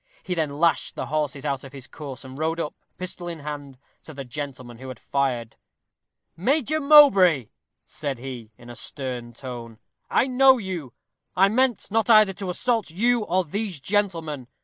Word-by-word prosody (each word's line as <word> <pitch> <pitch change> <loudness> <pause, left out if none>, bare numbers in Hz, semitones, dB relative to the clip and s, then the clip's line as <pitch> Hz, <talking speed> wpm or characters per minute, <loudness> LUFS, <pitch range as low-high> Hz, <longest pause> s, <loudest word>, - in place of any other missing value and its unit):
He 185 - -3
then 160 -4 0
lashed 160 +4 +1
the - - -3
horses 145 -2 -2
out 135 -2 -2
of 135 0 -11
his 135 -3 -9
course, 140 -3 -9
and 130 0 -10
rode 160 +3 -1
up, 150 - -3 0.2
pistol 180 -1 -6
in 165 -3 -6
hand, 145 -2 -7 0.2
to 155 - -11
the 135 -1 -6
gentleman 125 -3 -7
who 130 - -9
had 130 - -7
fired. 125 -5 -2 0.8
"Major 285 - +1
Mowbray," 195 - +7 0.4
said 140 -4 -4
he, 120 -3 -8
in 120 0 -12
a - - -10
stern 125 -3 -4
tone, 120 -2 -8 0.3
"I - - +3
know 265 0 +5
you. 180 - -5 0.4
I 195 +2 +5
meant 245 -1 +1
not 225 +2 +1
either 215 -3 +7
to 190 0 -5
assault 225 +3 0
you 230 +6 +1
or 185 0 +1
these 195 0 -3
gentlemen. 165 -6 -1
155 Hz, 170 wpm, -24 LUFS, 130-200 Hz, 0.8 s, Mowbray